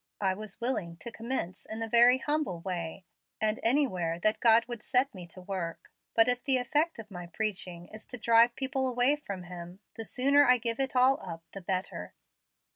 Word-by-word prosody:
I 190 -2 +1
was 210 +1 -8
willing 200 -9 -1
to 235 - -8
commence 220 -5 -4
in 220 +1 -5
a - - -3
very 240 +2 +6
humble 295 - -1
way, 175 0 -5 0.3
and 215 0 +1
anywhere 185 - +1
that 215 +3 +2
God 230 0 +5
would 240 -2 -7
set 260 +3 +1
me 180 -2 -9
to 185 +2 -12
work; 180 -3 -5 0.2
but 225 +1 +5
if 245 0 +2
the 270 -2 +3
effect 295 +6 0
of 220 -2 -10
my 175 -2 -8
preaching 180 -3 -3
is 215 0 -12
to 250 - -7
drive 235 +1 +4
people 265 0 -1
away 250 +3 +3
from 200 -11 -7
Him, 175 +1 -9
the 225 - -6
sooner 275 +6 +4
I 250 -2 +5
give 230 0 -1
it 270 -1 -1
all 260 +2 +4
up 165 -2 -8
the 195 - -8
better." 185 +1 -4
225 Hz, 200 wpm, -29 LUFS, 185-250 Hz, 0.3 s, very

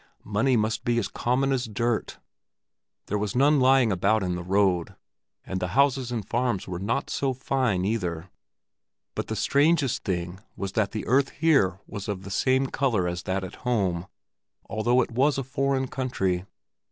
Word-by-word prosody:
Money 115 +5 +2
must 110 +1 0
be 120 0 +1
as 110 -4 0
common 130 +6 0
as 130 -1 0
dirt! 115 +1 -1 0.9
There 105 - -2
was 105 +1 -2
none 145 +3 +4
lying 130 -3 +4
about 100 +3 +2
in 90 -1 -1
the 90 - -3
road, 95 -1 +1 0.5
and 95 - -3
the 90 - -1
houses 135 -3 +3
and 110 -5 -3
farms 120 -5 -1
were 90 -2 -4
not 105 +5 -2
so 135 -1 0
very 130 +2 -19
fine 120 -9 +1
either. 90 -5 -2 0.8
But - - -4
the - - -3
strangest 145 -2 +2
thing 90 -1 -3 0.2
was 100 -1 -3
that 110 -2 +1
the 110 - -4
earth 135 +3 +3
here 135 - +2
was 100 -3 -7
of 100 -3 -4
the 100 - -8
same 130 +6 +2
color 125 -9 0
as 90 0 -3
that 95 +1 -2
at 95 - -8
home, 95 -8 0 0.6
although 120 +3 +2
it - - -8
was 135 +4 +2
a 135 - -1
foreign 135 0 0
country. 95 -9 -2
115 Hz, 175 wpm, -26 LUFS, 95-130 Hz, 0.9 s, none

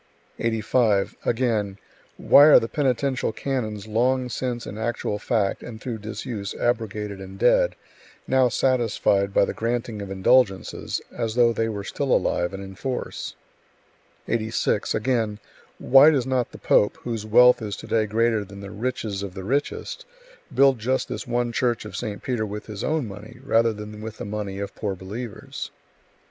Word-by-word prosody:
85. 110 -2 +1
Again: 110 -5 0 0.4
"Why 145 - +7
are 155 - +9
the 115 - -3
penitential 130 -2 0
canons 110 -6 -3
long 125 +3 +1
since 120 -1 -3
in - - -7
actual 110 -2 -2
fact 100 -3 0
and 110 -2 -8
through 115 -1 -5
disuse 105 -1 -5
abrogated 105 -4 -2
and 95 0 -9
dead, - - +3 0.5
now 130 -1 +4
satisfied 115 -6 +1
by 100 - +4
the - - -4
granting 115 -2 -2
of 100 - -6
indulgences, 95 +1 +1
as 115 -1 -2
though 120 -1 +4
they 115 0 0
were 100 -2 -4
still 135 +5 -3
alive 85 0 +1
and 95 0 -6
in 95 0 -9
force?" 125 +6 -4 0.9
86. 110 -1 0
Again: 110 -3 0 0.4
"Why 135 +4 +7
does 140 -6 +1
not 130 -2 0
the - - -10
pope, 105 - +3
whose 115 -3 -4
wealth 125 +3 +6
is 105 -2 -4
to - - -9
day 110 -1 +1
greater 110 0 +1
than 100 0 -11
the 100 0 -8
riches 110 -3 -3
of 100 -2 -6
the 95 - -6
richest, 140 - -2 0.4
build 135 -1 +4
just 130 +4 -1
this - - -5
one 120 0 0
church 120 -2 0
of 105 - -8
St. 105 -4 -5
Peter 120 -4 -1
with 105 +1 -6
his 105 -2 -6
own 155 -6 0
money, 105 +4 -10
rather 115 -3 +3
than 105 0 -8
with 110 0 -7
the - - -6
money 100 -1 -4
of 100 0 -5
poor 100 -3 -3
believers?" 110 +4 -7
110 Hz, 165 wpm, -24 LUFS, 105-125 Hz, 0.9 s, are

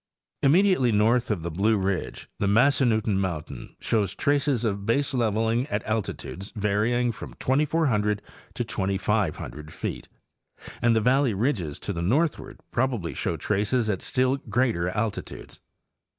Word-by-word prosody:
Immediately 155 -4 +4
north 115 +4 +3
of 100 -7 -1
the 85 - -3
Blue 105 +6 +2
ridge, 95 -2 -2
the 100 - +1
Massannutten 110 -3 +3
mountain 85 -6 -4
shows 105 -4 0
traces 140 -4 +1
of 100 -2 0
baseleveling 115 -2 +1
at 105 +1 -1
alti 110 -1 -1
tudes 95 +3 -8
varying 110 +4 +1
from 115 - -9
2,400 130 -7 +1 0.4
to - - -1
2,500 95 -6 -2
feet, - - -5 0.7
and 120 -1 +4
the 110 - +3
valley 125 0 +3
ridges 95 - -1
to 100 - -4
the 85 - -3
northward 145 - 0
probably 120 -9 -1
show - - -2
traces 105 +3 0
at 95 - -3
still 130 +1 +1
greater 120 -10 0
altitudes. 105 +2 -4
110 Hz, 135 wpm, -26 LUFS, 100-130 Hz, 0.7 s, Immediately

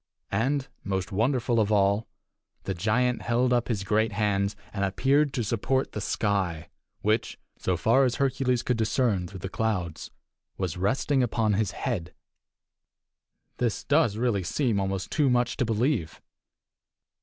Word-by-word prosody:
And, 130 +7 0 0.2
most 95 0 -2
wonderful 120 +3 +1
of 105 -1 +1
all, 100 +1 +2 0.6
the 95 - -2
giant 115 +7 +1
held 125 +1 +1
up 120 -1 +1
his 105 -5 -1
great 110 +2 +1
hands 100 -1 0 0.2
and 100 - -2
appeared 135 +9 +2
to 120 - 0
support 120 +5 0
the 105 - -4
sky, 95 -7 -1 0.3
which, 110 +2 0 0.2
so 90 -1 0
far 115 +10 +4
as 125 -2 +1
Hercules 130 -2 +1
could 125 - 0
discern 110 -4 +1
through 95 0 -10
the 95 - -3
clouds, 95 -6 -2 0.5
was 95 -4 -2
resting 130 +8 +1
upon 110 -3 +1
his 105 -1 +1 0.2
head! 95 -10 -3 1.4
This 120 -3 -1
does 145 -8 +2
really 115 -4 +1
seem 115 - 0
almost 95 -1 -2
too 145 -3 +2
much 120 -1 +1
to 130 - +1
believe. 115 - 0
110 Hz, 145 wpm, -27 LUFS, 100-125 Hz, 1.4 s, far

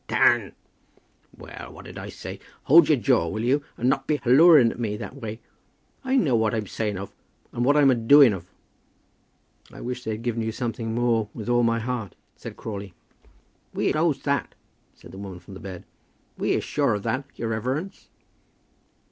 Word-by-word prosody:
"Dan!" - - +3 0.8
"Well, - - -10
what - - -12
did - - -9
I - - -7
say? - - -8 0.2
Hold 160 +1 +6
your 150 - +5
jaw, 120 -8 +2
will 110 +7 -3
you, 140 +4 +1
and 120 - -1
not 135 +1 +1
be 150 - +1
halloaing 140 -1 +6
at - - -10
me 105 -3 -2
that 130 - -8
way? 110 -3 -7 0.6
I 265 0 0
know 150 - +3
what 110 0 +1
I'm 110 - -1
a - - -14
saying 105 0 -3
of, 100 +2 -7 0.4
and 120 - -2
what 145 +4 +4
I'm 140 -2 +6
a - - +5
doing 125 +1 +6
of." 95 - -7 1.2
"I - - -12
wish 125 0 -5
they'd 110 0 -4
given 120 -1 -1
you 110 0 -2
something 115 -1 -4
more 115 -3 +1
with 115 0 -6
all 120 0 +3
my 115 -1 +2
heart," 115 -5 -4 0.2
said - - -10
Crawley. 100 -4 -7 0.8
"We - - +1
knows 155 -3 0
that," 140 -1 -1 0.4
said - - -15
the 95 - -10
woman 95 -2 -7
from 90 +3 -14
the 95 - -9
bed. 95 -2 -8 0.5
"We - - 0
is - - -1
sure 140 -7 0
of 100 - -5
that, 135 +2 -2
your 115 - -4
reverence." 130 - -4
120 Hz, 190 wpm, -24 LUFS, 110-135 Hz, 1.2 s, Hold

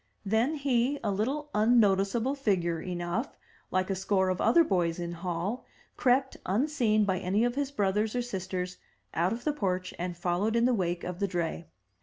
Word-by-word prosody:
Then 225 +9 +2
he, 275 -1 +1
a 210 - 0
little 275 +9 -2
unnoticeable 215 +2 +3
figure 180 - 0
enough, 175 - -3 0.3
like 185 +1 0
a - - 0
score 190 0 +1
of 185 - -1
other 340 - +5
boys 175 - 0
in 170 -1 -4
Hall, 175 +7 -3 0.3
crept, 260 +1 +2
unseen 220 -1 +2
by 190 -2 0
any 195 +4 +1
of 240 0 +1
his 280 +1 -1
brothers 210 -2 0
or 245 - 0
sisters, 185 -4 -4 0.4
out 175 +3 +1
of 235 +2 -4
the 300 - +1
porch 185 -8 -2
and 175 -1 -3
followed 180 +6 0
in 235 0 +3
the 250 - +3
wake 175 -5 -1
of 180 0 -5
the 200 - +1
dray. 170 -3 -3
200 Hz, 180 wpm, -29 LUFS, 180-240 Hz, 0.4 s, other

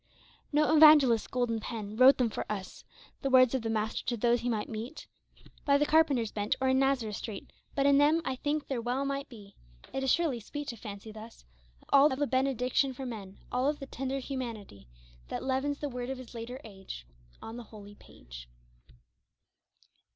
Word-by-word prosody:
140 - - -37
No 305 +1 +4
evangelist's 265 -8 +5
golden 240 -3 -1
pen 215 -2 -6
Wrote 255 +3 +7
them 240 -3 +1
for - - -5
us 195 -3 -6 0.2
— - - -25
The 275 - -1
words 255 -1 +6
of 260 - 0
the 225 - -3
Master 220 0 -1
to 240 - 0
those 240 +2 +2
he 245 - -1
might 215 -3 -1
meet 230 +7 -7 0.6
By 280 -1 +4
the 295 - +2
carpenter's 290 -8 +3
bench 205 0 -1
or 260 0 +1
in 260 0 +3
Nazareth 255 -6 +1
street 210 -4 -7
— - - -34
But 275 - +1
in 280 0 +5
them 300 +3 +4
I 260 - -2
think 295 +2 -2
there 260 -4 -2
well 250 +4 -1
might 275 0 -3
be 205 -5 -13 0.2
— - - -22
It 270 - -2
is 265 - +2
surely 320 -8 +1
sweet 290 +6 -6
to 235 - -5
fancy 210 -1 -9
thus 220 +2 -12 0.2
— - - -28
All 280 +2 +7
of 260 - -2
the 290 - +1
benediction 260 0 +1
for 265 - -6
men 200 -5 -7
All 255 +3 +1
of 295 - -2
the 275 - -7
tender 270 0 -4
humanity, 235 - -6 0.4
That - - -5
leaven 265 +2 -1
the 295 - -3
words 250 -2 -5
of 265 - -3
his 255 -1 -11
later 240 +2 -7
age 195 - -9 0.3
On 225 +1 -8
the 240 - -7
holy 205 -2 -12
page. - - -13
250 Hz, 210 wpm, -30 LUFS, 220-275 Hz, 0.6 s, Wrote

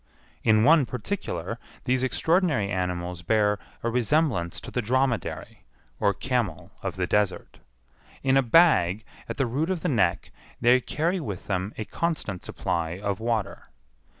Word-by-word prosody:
In 110 -1 +4
one 150 -1 +5
particular 115 - -4 0.2
these 130 0 +1
extraordinary 150 - +1
animals 90 -1 -2
bear 105 +2 +2 0.2
a 115 - +1
resemblance 120 - +1
to - - -9
the 125 - -1
dromedary, 130 +1 -1 0.4
or 100 - +3
camel 100 -5 -2
of 95 -4 -3
the 90 -1 -1
desert. 105 +1 -1 0.6
In 135 0 +3
a 135 - +6
bag 115 - +4 0.2
at - - -4
the 135 - +2
root 140 +8 -1
of 185 -3 -1
the - - 0
neck 100 - +1 0.3
they 125 +1 +5
carry 170 +8 -1
with 105 - -5
them 95 +1 -2
a 110 - -3
constant 110 - -2
supply 85 0 -2
of 100 0 -2
water. 115 -3 -2
110 Hz, 150 wpm, -26 LUFS, 95-135 Hz, 0.6 s, a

